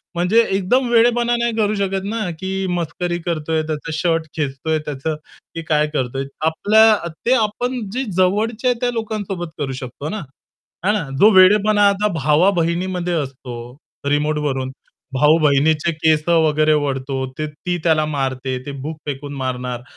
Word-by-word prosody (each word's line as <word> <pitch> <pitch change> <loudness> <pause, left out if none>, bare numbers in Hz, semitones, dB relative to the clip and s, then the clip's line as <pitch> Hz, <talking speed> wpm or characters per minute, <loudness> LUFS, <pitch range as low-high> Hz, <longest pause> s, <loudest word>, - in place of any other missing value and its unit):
म्हणजे 180 +7 +4
एकदम 220 +7 +1
वेडेपणा 240 +1 +3
नाही 235 -1 0
करू 215 -1 +1
शकत 195 -1 -1
ना, 220 -4 -2
की 190 0 -3
मस्करी 175 +1 -3
करतोय 160 -2 -1
त्याचा 155 +1 -4
शर्ट 165 -2 +1
खेचतोय 155 +2 -1
त्याचं, 150 +2 -3 0.4
की 165 - -3
काय 150 -1 +3
करतोय. 135 -1 -2 0.2
आपल्या 215 +7 +5 0.3
ते 245 - +4
आपण 245 +3 -1
जे 260 +2 -1
जवळचे 215 +6 +1
आहे 245 -2 +1
त्या 245 -1 +1
लोकांसोबत 205 -6 -4
करू 140 -2 -2
शकतो 135 +4 -6
ना. 215 +2 -4 0.6
हा 205 - +4
ना? 205 -8 -1
जो 210 - +8
वेडेपणा 205 +2 +5
आता 200 +1 +1
भावा-बहिणीमध्ये 175 +3 +1
असतो, 135 -5 -4 0.5
रिमोटवरून 145 -3 0 0.4
भाऊ-बहिणीचे 150 +2 +3
केस 155 -1 +2
वगैरे 155 -2 +3
ओढतो 135 -2 -1
ते 155 - -2
ती 175 +4 -4
त्याला 155 -2 +3
मारते, 135 -3 -2
ते 145 - -5
बुक 155 +1 -5
फेकून 145 0 -5
मारणार, 125 -2 -3
165 Hz, 145 wpm, -19 LUFS, 150-205 Hz, 0.6 s, जो